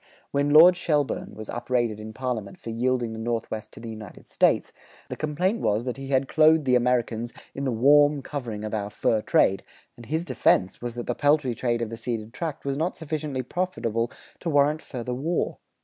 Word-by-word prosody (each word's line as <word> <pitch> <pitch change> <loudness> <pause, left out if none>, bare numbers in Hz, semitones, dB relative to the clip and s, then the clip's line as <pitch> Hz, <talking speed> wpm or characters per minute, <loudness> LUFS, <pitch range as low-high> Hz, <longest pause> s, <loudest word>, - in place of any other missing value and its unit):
When 140 +1 +1
Lord 165 +5 +8
Shelburne 150 -5 -1
was 110 -1 -8
upbraided 120 -3 -1
in 110 0 -7
parliament 110 -4 -4
for 115 - -6
yielding 120 0 0
the 110 - -6
Northwest 110 -1 -3
to - - -11
the 115 0 -7
United 110 -3 -10
States, - - +2 0.4
the - - -4
complaint 180 +9 -1
was 105 +3 +1
that 125 0 -3
he 135 0 -7
had 135 0 +1
clothed 155 0 +4
the 130 - +2
Americans 120 -2 +1 0.2
"in 140 - -4
the 130 - +1
warm 145 +4 +4
covering 120 -8 -5
of 110 - -5
our 105 -2 -2
fur 105 +1 +1
trade," 95 -2 +3 0.3
and 120 -1 -13
his 160 +3 -1
defense 95 - +2
was 120 -1 -5
that 120 - -4
the 120 - -1
peltry 145 -2 +2
trade 120 0 -1
of 115 - -5
the 115 - -5
ceded 115 -1 -4
tract 160 -2 -5
was 140 0 -1
not 165 +4 -1
sufficiently 150 -4 -3
profitable 120 -8 -2 0.3
to 170 - -3
warrant 145 +1 +3
further 125 -1 -5
war. 155 +7 -2
125 Hz, 195 wpm, -25 LUFS, 115-145 Hz, 0.4 s, Lord